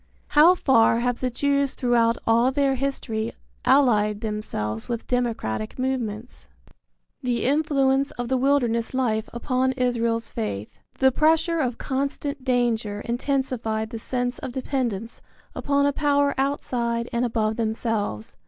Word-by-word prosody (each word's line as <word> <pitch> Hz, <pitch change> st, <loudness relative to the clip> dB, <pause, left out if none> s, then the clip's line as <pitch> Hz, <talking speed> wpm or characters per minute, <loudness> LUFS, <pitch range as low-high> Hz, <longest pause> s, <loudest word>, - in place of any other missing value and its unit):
How 320 Hz, +5 st, +6 dB
far 230 Hz, -8 st, +4 dB
have 245 Hz, 0 st, -1 dB
the 255 Hz, -, 0 dB
Jews 280 Hz, +2 st, 0 dB
throughout 235 Hz, -2 st, +2 dB
all 235 Hz, +3 st, +4 dB
their 275 Hz, 0 st, +2 dB
history 240 Hz, -4 st, -2 dB, 0.3 s
allied 215 Hz, -6 st, +3 dB
themselves 160 Hz, -, -4 dB
with 235 Hz, -1 st, -3 dB
democratic 220 Hz, -, -2 dB
movements? 250 Hz, -3 st, -3 dB, 0.2 s
III. -, -, -25 dB, 0.6 s
THE -, -, -2 dB
INFLUENCE 275 Hz, -1 st, +2 dB
OF 245 Hz, 0 st, -3 dB
THE 260 Hz, +1 st, +1 dB
WILDERNESS 250 Hz, -3 st, +1 dB
LIFE 220 Hz, -4 st, 0 dB
UPON 255 Hz, +2 st, 0 dB
ISRAEL'S 235 Hz, -2 st, 0 dB
FAITH. 105 Hz, -1 st, -5 dB, 0.2 s
The 265 Hz, 0 st, +4 dB
pressure 320 Hz, +4 st, +2 dB
of 250 Hz, -5 st, -1 dB
constant 280 Hz, +1 st, -3 dB
danger 235 Hz, -5 st, 0 dB
intensified 235 Hz, -3 st, -2 dB
the 230 Hz, -, -5 dB
sense 245 Hz, +1 st, -2 dB
of -, -, -5 dB
dependence 240 Hz, -5 st, -3 dB, 0.3 s
upon 280 Hz, 0 st, +1 dB
a 285 Hz, -, +2 dB
power 285 Hz, -1 st, +2 dB
outside 240 Hz, -4 st, -1 dB
and 235 Hz, +1 st, +1 dB
above 220 Hz, -2 st, 0 dB
themselves. 220 Hz, -, -2 dB
245 Hz, 135 wpm, -24 LUFS, 225-270 Hz, 0.6 s, How